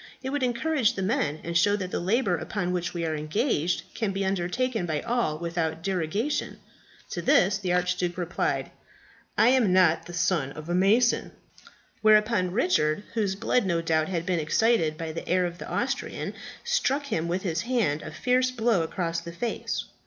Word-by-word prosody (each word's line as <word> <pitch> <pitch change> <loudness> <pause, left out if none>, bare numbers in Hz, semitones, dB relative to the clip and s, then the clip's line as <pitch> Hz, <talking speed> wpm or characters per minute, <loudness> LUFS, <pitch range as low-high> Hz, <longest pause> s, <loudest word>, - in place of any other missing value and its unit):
'It 265 - -3
would 290 0 -1
encourage 250 -1 +1
the 195 - -3
men, 190 - 0
and 170 0 -4
show 205 +4 +4
that 185 -3 -4
the - - -1
labour 195 +1 +1
upon 180 +2 -3
which 175 -1 -2
we 170 -1 -3
are 160 -1 -1
engaged 170 - 0
can 220 -4 -1
be 195 0 -2
undertaken 190 +3 -1
by 155 -2 -1
all 235 -11 0
without 165 -1 -2
derogation.' 195 - -1 0.5
"To 175 - -3
this 190 +3 +3
the 185 -3 -2
Archduke 180 0 0
replied, 180 -1 -1 0.7
"'I 230 - +6
am 250 -8 +3
not 180 -3 +4
the 175 - -9
son 170 -6 0
of 155 +2 -9
a - - 0
mason!' 210 +7 +3 0.7
"Whereupon 215 -3 +4
Richard, 180 -4 +1
whose 205 -4 0
blood 205 +2 +1
no 170 -2 +1
doubt 160 -1 +1
had 170 -3 -2
been 180 -2 0
excited 160 -1 +2
by 160 -1 -4
the 160 - -7
air 180 +1 +3
of 175 0 -5
the - - -7
Austrian, - - -2 0.3
struck 475 - 0
him 170 - -2
with 180 +2 -2
his 170 -3 -1
hand 225 - 0
a - - -7
fierce 255 +1 +1
blow 230 -6 +1
across 170 0 -2
the 170 0 -8
face. 225 +8 -3
185 Hz, 180 wpm, -26 LUFS, 170-225 Hz, 0.7 s, I